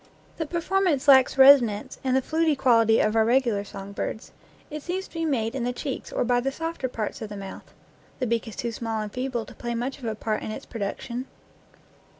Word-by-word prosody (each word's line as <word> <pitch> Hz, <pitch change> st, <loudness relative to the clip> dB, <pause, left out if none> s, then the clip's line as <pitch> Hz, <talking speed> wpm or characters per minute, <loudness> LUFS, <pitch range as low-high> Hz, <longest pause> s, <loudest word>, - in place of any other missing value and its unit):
The 320 Hz, -, -3 dB
performance 340 Hz, -3 st, 0 dB
lacks 265 Hz, -1 st, +6 dB
resonance 265 Hz, -3 st, +6 dB
and 260 Hz, -1 st, +1 dB
the 265 Hz, -, +2 dB
fluty 320 Hz, 0 st, +1 dB
quality 230 Hz, -4 st, +4 dB
of 215 Hz, +1 st, +2 dB
our 225 Hz, -, +5 dB
regular 235 Hz, -3 st, +2 dB
song 195 Hz, 0 st, -9 dB
birds; 220 Hz, +2 st, -5 dB, 0.4 s
it 300 Hz, 0 st, -5 dB
seems 370 Hz, +5 st, -4 dB
to -, -, -24 dB
be 330 Hz, -1 st, -2 dB
made 230 Hz, -7 st, 0 dB
in 265 Hz, -3 st, -2 dB
the 245 Hz, -, 0 dB
cheeks 265 Hz, +2 st, -5 dB
or -, -, 0 dB
by 245 Hz, 0 st, +2 dB
the 270 Hz, +2 st, -1 dB
softer 325 Hz, -2 st, -3 dB
parts 225 Hz, -4 st, -4 dB
of 220 Hz, -, -5 dB
the 205 Hz, -, -7 dB
mouth. 195 Hz, -1 st, -9 dB, 0.5 s
The 255 Hz, -, -1 dB
beak 230 Hz, 0 st, -1 dB
is 220 Hz, -, -8 dB
too 235 Hz, -, -3 dB
small 225 Hz, -1 st, -3 dB
and 210 Hz, -, -7 dB
feeble 250 Hz, -3 st, -2 dB
to -, -, -12 dB
play 240 Hz, -1 st, -4 dB
much 255 Hz, +4 st, -3 dB
of 255 Hz, -, -9 dB
a 220 Hz, -1 st, -2 dB
part 215 Hz, 0 st, -2 dB
in -, -, -5 dB
its 215 Hz, -, -6 dB
production. 235 Hz, +4 st, -5 dB
245 Hz, 220 wpm, -25 LUFS, 225-275 Hz, 0.5 s, lacks